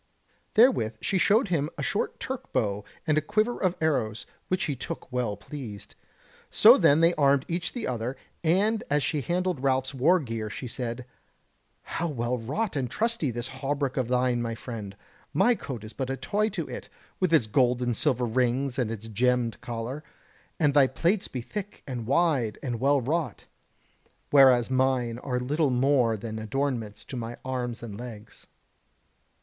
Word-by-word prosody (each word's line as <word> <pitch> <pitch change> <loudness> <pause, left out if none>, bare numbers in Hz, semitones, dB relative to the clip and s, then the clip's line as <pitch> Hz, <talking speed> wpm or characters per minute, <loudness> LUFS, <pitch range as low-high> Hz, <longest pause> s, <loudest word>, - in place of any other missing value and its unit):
Therewith 220 - +4
she 190 - 0
showed 210 +4 +3
him 155 -4 0
a - - -3
short 205 - -1
Turk 265 -1 -5
bow 105 -5 0 0.2
and 155 -1 +3
a - - -5
quiver 215 +8 0
of 185 -2 +1
arrows, 125 -9 0 0.2
which 185 0 0
he 145 - -1
took 130 - -7
well 125 -5 -1
pleased. 115 -9 -8 0.6
So - - +8
then 145 +3 +4
they 165 +1 +5
armed 140 -3 +3
each 170 +1 -2
the 245 - -3
other, 125 +1 -3 0.3
and 200 +7 +2
as 145 0 +2
she 150 - 0
handled 180 +1 -1
Ralph's 130 -1 +1
wargear 130 -7 +1
she 125 - -6
said: 120 0 -4 0.8
"How 170 - -3
well 125 -4 -2
wrought 150 - -2
and 130 -3 -1
trusty 230 - 0
is 120 - -5
this 120 +1 -3
hauberk 135 +1 -2
of 130 -3 0
thine, 125 -1 +1
my 115 -1 -2
friend; 110 -5 -7 0.4
my 245 - +5
coat 130 - -6
is 110 - -9
but 130 -1 -3
a 135 - -2
toy 205 +11 0
to - - -4
it, - - -7 0.3
with 185 -3 +1
its 155 -8 +5
gold 125 +3 +2
and 120 -2 0
silver 130 -4 +1
rings 125 +3 0
and 120 -4 +1
its 115 0 -6
gemmed 120 +1 +1
collar: 120 +5 -5 0.6
and 150 -4 +3
thy 140 -2 +6
plates 175 +10 0
be 125 - -5
thick 205 - -7
and 120 -5 -5
wide 135 -7 +2
and 120 -4 -2
well 140 +2 +3
wrought, 145 - -2 0.9
whereas 130 -3 +6
mine 130 -3 +1
are 125 -1 -2
little 145 +4 +1
more 125 -3 +3
than 110 +1 -5
adornments 115 -2 -3
to - - -7
my 120 -1 -5
arms 125 -2 -3
and 105 -3 -7
legs." 115 -3 -10
130 Hz, 175 wpm, -27 LUFS, 120-155 Hz, 0.9 s, So